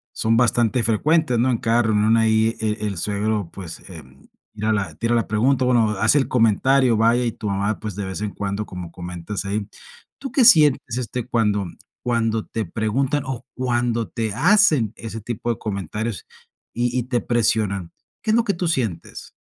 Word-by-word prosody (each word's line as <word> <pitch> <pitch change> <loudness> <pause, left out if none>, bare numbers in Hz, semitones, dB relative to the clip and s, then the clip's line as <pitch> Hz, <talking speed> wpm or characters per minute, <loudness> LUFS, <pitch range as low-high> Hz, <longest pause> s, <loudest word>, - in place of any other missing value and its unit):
son 115 +1 +1
bastante 120 -1 +2
frecuentes, 125 +3 +2
¿no? 130 +2 +2
En 120 - +1
cada 115 +1 +2
reunión 110 +1 +3
ahí 110 0 +2
e 105 -1 -2
el 100 -3 -3
suegro, 105 0 -1
pues, 90 -4 -8
em, 70 -6 -13 0.3
tira 110 +1 -1
la 100 -7 -1
tira 120 +1 0
la 115 - 0
pregunta, 125 +5 +2
o, - - +1
bueno, 115 -3 +3
hace 110 +7 +4
el 135 - 0
comentario, 125 +2 +3
vaya, 115 +3 +3
y 115 - 0
tu 105 - -7
mamá, 100 +2 -1
pues, 105 -4 -6
de 100 -2 -4
vez 95 +2 -5
en 105 -2 -3
cuando, 100 +1 -4
como 90 -2 -8
comentas 90 +3 -6
ahí. 100 +1 -2 0.5
¿Tú 270 - -6
qué 255 -5 +4
sientes, 145 - +5
este, 125 -1 -4
cuando 105 -5 +1 0.4
cuando 115 -2 0
te 110 -2 -4
preguntan 125 - -1
o 130 -1 -5
cuando 120 -2 -1
te 110 -3 -3
hacen 155 - +4
ese 115 -1 -7
tipo 120 +2 -4
de 115 - 0
comentarios, 105 0 -4 0.5
y 120 +1 -1
y - - -2
te 120 -1 -1
presionan? 105 -6 0 0.3
¿Qué 215 - -1
es - - +3
lo 235 - +3
que 200 - 0
tú 175 0 -2
sientes? 115 - -3
115 Hz, 190 wpm, -22 LUFS, 105-125 Hz, 0.5 s, sientes